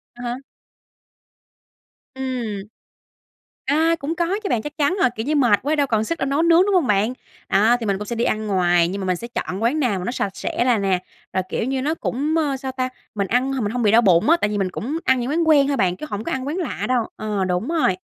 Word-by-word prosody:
À 245 - -9
há. - - -5 1.8
Ừm. 245 -6 -3 1.0
A, 320 +4 +2
cũng 300 +4 -2
có 340 0 +1 0.2
chứ 395 - -2
bạn, 220 -2 +1
chắc 295 - -7
chắn 300 +6 +2
rồi, 250 - +4
kiểu 220 +4 -4
như, 305 - +1
mệt 240 -8 +4
quá 300 +3 0
đâu 285 -1 +2
còn 220 -3 +1
sức 335 +7 -3
đâu 270 - -1
nấu 280 +4 +1
nướng, 335 +1 +6
đúng 405 - +1
hông 340 -8 +3
bạn? 210 +4 +2 0.4
Đó, 220 +5 +4
thì 225 - -3
mình 195 -1 0
cũng 210 - -6
sẽ 235 - -4
đi 235 - +1
ăn 215 0 -1
ngoài, 175 -3 +3
nhưng 195 +2 -4
mà 190 - -3
mình 185 - +1
sẽ 235 +7 -7
chọn 195 -3 -4
quán 275 +7 +1
nào 220 -8 +1
mà 180 - -5
nó 240 - -2
sạch 195 -6 -3
sẽ 240 - -1
là 245 -4 +3
nè, 190 -2 0 0.3
rồi, 185 - 0
kiểu 225 - -2
như, 265 0 -1
nó 305 +3 0
cũng, 300 +1 -2
ơ, 285 -4 0
sao 265 0 -5
ta? 255 0 -2 0.3
Mình 200 -2 -1
ăn 255 +3 +1
h 260 -3 -2
mình 205 - -1
hông 245 0 -1
bị 210 - +4
đau 225 - +6
bụng 185 - +4
á, 335 - +7
tại 205 - +1
vì 205 - -1
mình 190 -2 0
cũng 285 - -4
ăn 260 -1 +3
những 245 +3 -2
quán 325 +1 +1
quen 285 -3 +5
thôi 280 - 0
bạn, 180 -4 +1
chứ 305 - -7
hổng 205 +2 -4
có - - -3
ăn 265 0 -3
quán 305 +5 -2
lạ 330 -8 -3
đâu, 245 -3 +1
ờ, 210 -3 -2
đúng 180 - -1
rồi. 315 - +1
245 Hz, 270 wpm, -21 LUFS, 205-285 Hz, 1.8 s, á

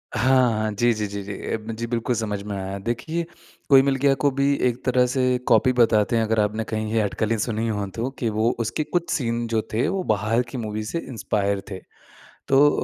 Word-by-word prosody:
हाँ, 130 -1 +4
हाँ। 110 0 -1
जी, 120 +3 +2
जी, 105 -1 -2
जी, 100 0 -5
ए 110 - -3
म 115 - -3
जी 115 0 -3
बिल्कुल 120 +1 -1
समझ 105 -3 -2
में 105 -1 -5
आया 95 0 -4
देखिए 160 +8 -2 0.4
कोई 135 -1 +8
मिल 135 0 +1
गया 135 +1 +3
को 145 - +4
भी 140 +1 +2
एक 120 0 -3
तरह 125 0 +3
से 125 0 +1
कॉपी 130 -1 +4
बताते 115 -2 +3
हैं 115 - +2
अगर 110 0 0
आपने 105 +2 0
कहीं 110 -1 -3
ये 115 - +3
अटकलें 110 +2 -1
सुनी 110 +1 -1
हों 105 -2 -2
तो 120 +3 -2
कि 115 - 0
वो 110 +2 +1
उसके 115 +7 -1
कुछ 175 +2 -2
सीन 120 -3 -1
जो 115 -1 0
थे 115 - +1
वो 195 -1 -1
बाहर 110 +4 +1
की 130 - -5
मूवी 110 -1 -3
से 165 +10 -3
इंस्पायर 100 -3 -1
थे। 95 - -5 0.7
तो 140 +2 +6
115 Hz, 220 wpm, -23 LUFS, 105-130 Hz, 0.7 s, कोई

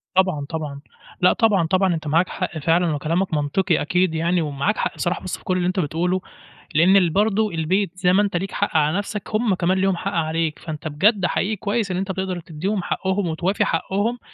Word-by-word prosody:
طبعًا، 185 -7 +2
طبعًا، 150 -3 -5 0.4
لأ، 180 - +5
طبعًا، 205 -8 +2
طبعًا 185 +1 +2
أنت 155 -1 -6
معاك 165 +5 +2
حق 160 - -4
فعلًا، 165 +1 +2
وكلامَك 165 +5 -1
منطقي 150 +3 +1
أكيد 180 +1 +1
يعني، 170 +2 +1
ومعاك 150 +7 -1
حق - - -2
بصراحة، 175 0 -2
بس 185 - -4
في - - -20
كل 185 0 0
اللي 180 - 0
أنت 185 +1 0
بتقوله، 175 +4 0 0.5
لأن 180 +2 +5
برضه 210 +2 +2
البيت، 180 +4 0
زي 180 -1 +3
ما 200 - +5
أنت 200 -4 0
ليك 195 +2 -4
حق 205 -4 -2
على 155 +4 +2
نَفسَك، 205 0 -4
هُم 220 -2 +2
كمان 185 +1 +1
ليهم 190 -1 +2
حق - - -3
عليك. 160 -1 -1
فأنت 155 -1 -6
بجد 190 +6 +2
حقيقي 205 +4 0
كويس 205 0 -1
إن 180 - -1
أنت 190 +1 -2
بتقدر 190 -1 -3
تديهم 175 +4 -3
حقهم، 190 0 -1
وتوافي 170 +5 0
حقهم، 220 +5 -1
180 Hz, 200 wpm, -22 LUFS, 160-195 Hz, 0.5 s, لأ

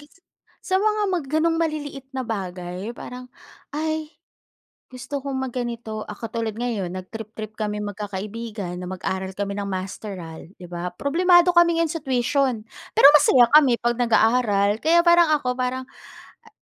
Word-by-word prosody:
gas 290 0 -18 0.5
sa 375 - 0
mga 425 +2 +1
ma 370 -1 +1
gano'ng 315 +4 +1
maliliit 295 -4 -3
na 265 - -3
bagay, 180 -3 -5
'yong 240 - -10
parang, 250 0 -8 0.5
"Ay, 315 +1 -3 0.8
gusto 255 +3 -6
kong 275 -1 -4
mag 260 -2 -3
ganito," 235 -3 -4
ah, - - -8
katulad 225 -1 -4
ngayon, 230 -6 -2
nag 185 0 -8
trip-trip 220 -1 -7
kaming 210 -1 -3
magkakaibigan 205 -2 -5
na 180 - -6
mag-aral 190 0 -3
kami 200 0 -2
ng 200 - -4
masteral, 185 -3 -6
'di 180 - -10
ba. 175 +1 -3
Problemado 350 +4 +4
kami 340 -1 +5
ngayon 330 -2 +1
sa 330 - -4
tuition, 260 -3 0 0.3
pero - - +9
masaya 265 -4 +6
kami 280 -6 +6
pag 240 +1 0
nag-aaral, 220 -3 +3
kaya 335 +2 +4
parang 340 -1 +6
ako, 250 -3 -2
parang, 255 +1 -2 0.6
a - - -22
240 Hz, 160 wpm, -23 LUFS, 205-295 Hz, 0.8 s, pero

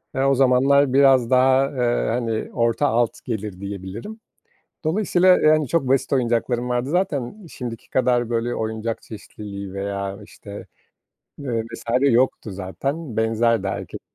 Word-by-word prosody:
eee, 135 - 0
o 135 0 +3
zamanlar 135 +1 +4
biraz 135 -3 +5
daha, 130 +1 +4
eee, 120 -3 0
hani, 115 -1 -2
orta 115 +4 +1
alt 120 -2 0
gelir, 105 -5 -4
diyebilirim. 100 - -7 0.7
Dolayısıyla 185 +2 +2
yani 155 -2 +3
çok 160 -4 0
basit 135 +1 +1
oyuncaklarım 120 -1 0
vardı. 125 +2 -1
Zaten 180 - -2
şimdiki 120 -3 -7
kadar, 120 -2 +1
böyle, 120 +1 -1
oyuncak 110 +1 -3
çeşitliliği 100 -2 -9
veya, 100 0 -4
işte, 100 0 -11 0.7
ııı, 120 -5 -2
vs. 115 +1 -10 0.2
yoktu 130 -4 +2
zaten. 125 - -4
Benzerdi 115 +1 +1
herkesin. - - -5
120 Hz, 130 wpm, -22 LUFS, 110-135 Hz, 0.7 s, biraz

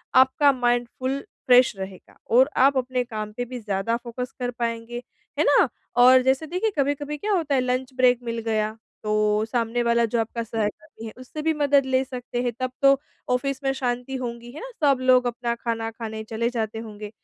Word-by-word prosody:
आपका 265 +2 +5
mind 245 -2 +1
full 265 +2 -1 0.3
fresh 250 -2 +6
रहेगा 190 -1 -9
और 260 +5 +5
आप 270 +1 +5
अपने 255 0 0
काम 215 -3 -5
पे 245 - -2
भी 250 0 -7
ज़्यादा 205 +1 -1
फोकस 245 +1 -6
कर 245 -1 -2
पाएँगे, 235 0 -4 0.4
है - - +5
ना? - - +5 0.3
और 255 +1 +7
जैसे 265 +4 +1
देखिए 370 +6 -1
कभी-कभी 285 +1 -1
क्या 420 +6 -2
होता 310 -6 +1
है 255 - +3
लंच 255 +1 -2
ब्रेक 250 -1 +4
मिल 230 -1 -3
गया, 215 0 -1 0.3
तो 215 0 +1
सामने 235 +1 -1
वाला 235 0 +3
जो 230 +1 -1
आपका 230 +1 -2
सहकर्मी 215 0 -4
है, - - -7
उससे 255 +4 -7
भी 320 +1 +1
मदद 285 -2 +3
ले 260 0 +2
सकते 250 -2 -5
हैं। 245 - 0
तब 255 -1 -2
तो 275 0 +6 0.3
ऑफिस 275 +2 -1
में 270 - +2
शांति 250 0 -3
होंगी 240 -2 -5
है, 290 - -9
ना? - - -7 0.2
सब 270 -2 +4
लोग 255 -1 +4
अपना 235 0 -2
खाना 230 -1 -3
खाने 220 -1 -6
चले 230 +2 -2
जाते 225 -2 -3
होंगे? 210 -2 -8
245 Hz, 200 wpm, -24 LUFS, 230-260 Hz, 0.4 s, और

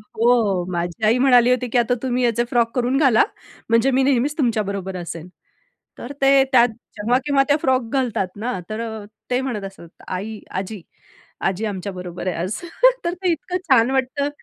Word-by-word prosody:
हो, 220 -6 +2
माझी 175 +5 -2
आई 225 +3 +4
म्हणाली 250 -2 +5
होती 250 0 +1
की - - +3
आता 240 +1 +2
तुम्ही 250 -1 0
याचे 235 0 +2
फ्रॉक 235 -1 +1
करून 250 +2 +1
घाला 265 -7 +5 0.5
म्हणजे 230 +4 +3
मी 265 +1 +2
नेहमीच 280 +3 +1
तुमच्याबरोबर 200 - -1
असेल. 170 -1 -7 0.7
तर 245 - -8
ते 270 0 +6
त्यात 245 -1 +6 0.3
जेव्हा-केव्हा 260 +6 +2
त्या 290 +1 +3
फ्रॉक 255 -3 +1
घालतात 245 -8 0
ना, 230 -2 -3
तर 215 +1 -4
अ, 220 -2 -6 0.3
ते 250 +1 +2
म्हणत 235 -7 -4
असतात, 195 -4 -11 0.2
"आई, 205 +3 -5
आजी 195 +1 -5 0.7
आजी 195 +4 -2
आमच्याबरोबर 185 -3 -5
आहे 180 - -1
आज." 185 +5 -3 0.5
तर 345 - 0
ते 365 -1 -1
इतकं 355 +3 -2
छान 245 -1 +5
वाटतं 270 +2 0
235 Hz, 170 wpm, -21 LUFS, 200-260 Hz, 0.7 s, ते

